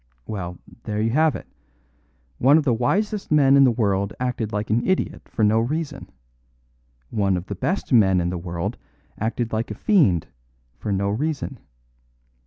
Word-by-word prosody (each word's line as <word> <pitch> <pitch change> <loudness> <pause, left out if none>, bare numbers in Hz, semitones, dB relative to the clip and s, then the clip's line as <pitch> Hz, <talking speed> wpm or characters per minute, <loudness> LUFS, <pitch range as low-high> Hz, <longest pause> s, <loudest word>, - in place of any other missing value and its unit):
Well, 90 -4 -5 0.3
there 105 -1 -2
you 110 +1 +1
have 155 +3 +3
it. - - -7 0.9
One 140 +5 +6
of 160 - +2
the 130 -4 +2
wisest 200 - -1
men 140 -3 +5
in 140 -1 +7
the - - +5
world 100 -3 0
acted 125 -4 -2
like 105 0 -3
an 115 +2 +2
idiot 190 0 -1
for 110 - -1
no 105 +1 +4
reason. 150 +6 -3 1.0
One 100 -4 +1
of 90 - -5
the 100 - -5
best 160 - -2
men 95 -6 +5
in 85 0 -1
the 90 - -3
world 85 -1 -4 0.4
acted 115 +1 -2
like 110 +1 -1
a 105 - -5
fiend 110 - +3 0.5
for 105 - -3
no 100 0 0
reason. 145 +9 -2
110 Hz, 170 wpm, -23 LUFS, 100-140 Hz, 1.0 s, in